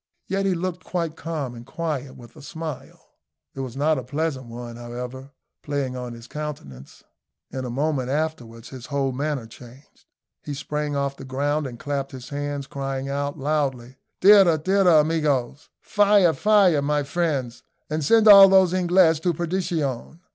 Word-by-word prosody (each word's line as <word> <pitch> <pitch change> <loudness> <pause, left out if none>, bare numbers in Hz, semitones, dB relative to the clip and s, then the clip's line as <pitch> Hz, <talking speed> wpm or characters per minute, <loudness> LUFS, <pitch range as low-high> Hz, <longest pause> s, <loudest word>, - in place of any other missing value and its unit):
Yet 195 0 -1
he 190 - +1
looked 180 +1 -4
quite 170 -3 -3
calm 155 -7 -5
and 120 -1 -10
quiet, 140 -1 -4
with 120 -2 -15
a - - -13
smile 160 -1 -8 0.4
it - - -10
was 130 -1 -5
not 150 0 +2
a - - -7
pleasant 140 -1 -3
one, 120 0 -8
however 125 +3 -8 0.3
playing 140 -3 -3
on 125 -1 -6
his 115 0 -11
countenance. 120 - -8 0.5
In 130 -1 -5
a - - -4
moment 135 0 -1
afterwards 125 -6 -4
his 130 -3 -10
whole 140 -2 -1
manner 140 -1 -3
changed; 125 +4 -16 0.4
he 145 - -6
sprang 150 +1 -3
off 140 0 -2
the - - -10
ground 145 +3 -1
and 120 -2 -9
clapped 140 0 -4
his 125 -1 -9
hands, 145 -1 -4
crying 135 0 -4
out 140 +1 -3
loudly, 135 -4 -2 0.2
"Tira! 195 -4 +7
tira, 180 -1 +4
amijos." 145 -5 -1
"Fire! 205 -4 +3
fire, 200 -8 +3
my 145 +1 0
friends! 140 -6 -2 0.3
and 155 0 -3
send 220 +8 +4
all 200 -2 +10
those 190 -2 +5
English 175 -3 +3
to 175 +1 -1
perdition." 165 -5 -3
145 Hz, 160 wpm, -23 LUFS, 130-165 Hz, 0.5 s, all